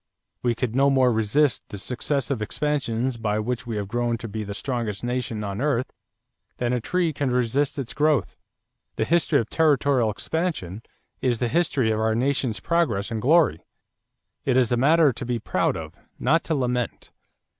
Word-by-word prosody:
We 120 Hz, -1 st, +1 dB
could 120 Hz, -1 st, -2 dB
no 140 Hz, +1 st, +4 dB
more 130 Hz, -2 st, +4 dB
resist 115 Hz, +6 st, +1 dB
the 105 Hz, -, -6 dB
successive 130 Hz, +3 st, -1 dB
expansions 130 Hz, -1 st, -1 dB
by 105 Hz, -2 st, -1 dB
which 120 Hz, +2 st, -3 dB
we 115 Hz, -, -3 dB
have 100 Hz, -2 st, -3 dB
grown 120 Hz, +2 st, -1 dB
to 115 Hz, -, -7 dB
be 110 Hz, 0 st, -4 dB
the 100 Hz, -1 st, -6 dB
strongest 115 Hz, -5 st, -3 dB
nation 120 Hz, -3 st, -2 dB
on 100 Hz, +2 st, -4 dB
earth 135 Hz, -4 st, 0 dB, 0.6 s
than 125 Hz, 0 st, 0 dB
a 125 Hz, -, 0 dB
tree 175 Hz, +5 st, 0 dB
can 140 Hz, -1 st, -1 dB
resist 130 Hz, +4 st, 0 dB
its 130 Hz, -4 st, -3 dB
growth. 150 Hz, -5 st, +1 dB, 0.6 s
The 110 Hz, -, 0 dB
history 165 Hz, -1 st, +3 dB
of 115 Hz, -, -2 dB
territorial 140 Hz, -6 st, +3 dB
expansion 110 Hz, -, -3 dB, 0.4 s
is 125 Hz, -2 st, +1 dB
the 120 Hz, -, 0 dB
history 135 Hz, -6 st, +1 dB
of 110 Hz, -, 0 dB
our 110 Hz, 0 st, +1 dB
nation's 125 Hz, -3 st, 0 dB
progress 120 Hz, -, 0 dB
and 110 Hz, -1 st, -2 dB
glory. 145 Hz, -, +3 dB, 0.8 s
It 130 Hz, -2 st, +2 dB
is 125 Hz, -3 st, +3 dB
a -, -, +4 dB
matter 150 Hz, +3 st, +4 dB
to 125 Hz, -, -6 dB
be 120 Hz, 0 st, -1 dB
proud 115 Hz, -, 0 dB
of, -, -, -9 dB, 0.2 s
not 160 Hz, +6 st, +2 dB
to 160 Hz, -, 0 dB
lament. 125 Hz, -3 st, -2 dB
125 Hz, 175 wpm, -24 LUFS, 110-140 Hz, 0.8 s, no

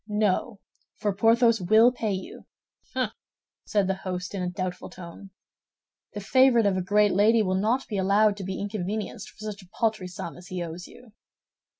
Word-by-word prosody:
"No, 210 Hz, 0 st, 0 dB, 0.4 s
for 205 Hz, -1 st, -1 dB
Porthos 230 Hz, +2 st, +3 dB
will 220 Hz, +7 st, +5 dB
pay 225 Hz, -4 st, -2 dB
you." 190 Hz, -, -7 dB, 0.5 s
"Hum!" -, -, 0 dB, 0.5 s
said 205 Hz, -2 st, +1 dB
the 190 Hz, -, 0 dB
host, 180 Hz, -1 st, -4 dB
in 195 Hz, -, -3 dB
a 180 Hz, -, -1 dB
doubtful 180 Hz, 0 st, -5 dB
tone. 185 Hz, +2 st, -11 dB, 0.8 s
"The 205 Hz, -, -5 dB
favorite 255 Hz, +1 st, +4 dB
of 200 Hz, -2 st, +2 dB
a 185 Hz, -, 0 dB
great 205 Hz, +2 st, +3 dB
lady 215 Hz, +3 st, +4 dB
will 185 Hz, -2 st, 0 dB
not 240 Hz, +6 st, 0 dB
be 205 Hz, -3 st, -2 dB
allowed 200 Hz, +2 st, +3 dB
to 200 Hz, -, -6 dB
be 190 Hz, 0 st, -4 dB
inconvenienced 205 Hz, +1 st, -4 dB
for -, -, -22 dB
such 200 Hz, 0 st, -11 dB
a 185 Hz, -, -18 dB
paltry 220 Hz, -5 st, 0 dB
sum 175 Hz, -1 st, -7 dB
as 175 Hz, 0 st, -13 dB
he 180 Hz, -1 st, -4 dB
owes 170 Hz, +2 st, -7 dB
you." 245 Hz, -3 st, -16 dB
205 Hz, 185 wpm, -26 LUFS, 185-220 Hz, 0.8 s, will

